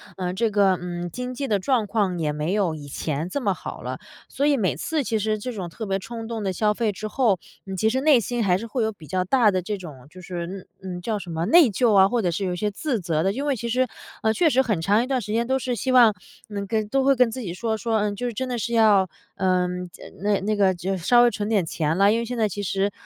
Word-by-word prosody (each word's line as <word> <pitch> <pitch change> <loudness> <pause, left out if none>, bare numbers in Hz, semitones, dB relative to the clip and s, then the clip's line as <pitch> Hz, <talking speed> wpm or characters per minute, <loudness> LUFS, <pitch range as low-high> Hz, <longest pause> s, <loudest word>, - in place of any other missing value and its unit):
呃， 180 -1 -2
这 220 +4 0
个 195 -2 +4
嗯， 175 0 -5
经 250 +6 -5
济 275 +2 -3
的 210 -4 +2
状 220 +1 0
况 195 -6 0
也 150 -2 0
没 150 +5 -2
有 190 -6 +1
以 145 -2 -9
前 150 +2 -3
这 280 +10 -3
么 - - +1
好 - - -8
了， - - -4 0.3
所 280 - -1
以 290 -1 +3
每 185 - 0
次 295 - -1
其 225 - -1
实 215 0 -1
这 250 +4 -4
种 195 -6 -5
特 215 +5 -7
别 195 - 0
冲 225 +3 -7
动 225 -2 -4
的 190 -1 -1
消 210 +2 +2
费 220 0 0
之 210 +2 -6
后， 215 -5 +1 0.3
嗯， 195 - -5
其 220 +4 +2
实 260 +4 0
内 290 -3 +5
心 235 +1 -2
还 180 -1 +3
是 230 - -6
会 235 +1 -1
有 220 - 0
比 175 -7 -14
较 185 +2 0
大 220 +3 +4
的 185 -2 +1
这 210 +3 -2
种 150 -10 -10
就 185 - -12
是 175 -1 -5
嗯 185 +2 -8 0.3
嗯， - - -8
叫 215 +3 -2
什 180 -4 -8
么 165 +1 -2
内 340 -3 +7
疚 225 +1 +2
啊， 190 -1 +7
或 235 +2 0
者 180 - +1
是 170 +4 -2
有 180 - -1
一 - - -3
些 210 +4 -1
自 235 +2 -2
责 165 -2 0
的。 195 +2 +1
因 275 +6 -3
为 280 - +2
其 235 0 -5
实， 255 +2 +2 0.3
呃， 220 - +2
确 335 +9 +2
实 265 - +4
很 215 -9 0
长 205 +6 +3
一 - - -5
段 265 -1 0
时 210 -2 -6
间 230 +1 0
都 265 +1 +2
是 255 -1 -2
希 255 +4 -2
望 240 -4 +7 0.4
能 200 -1 -4
跟 215 0 -1
都 270 +3 +2
会 275 0 +4
跟 250 -2 +3
自 255 - -5
己 180 -6 -5
说， 225 +2 -1
说：” 225 +1 -1
嗯， 205 -1 -1
就 245 +4 -3
是 240 - -4
真 260 +5 -3
的 245 -2 -3
是 235 - -3
要 210 -5 +4 0.3
嗯， 180 -1 0
这 - - -14 0.2
那 205 -1 +2
那 210 +2 0
个 195 -2 +3
就 185 +2 -2
稍 240 +7 +4
微 240 - +4
存 210 0 -3
点 200 -6 +2
钱 160 0 -1
了。 200 +1 +5
“因 230 - +1
为 235 - -2
现 245 +1 -5
在 220 - +2
其 205 - -5
实 195 +1 0
210 Hz, 310 characters per minute, -24 LUFS, 185-235 Hz, 0.4 s, 内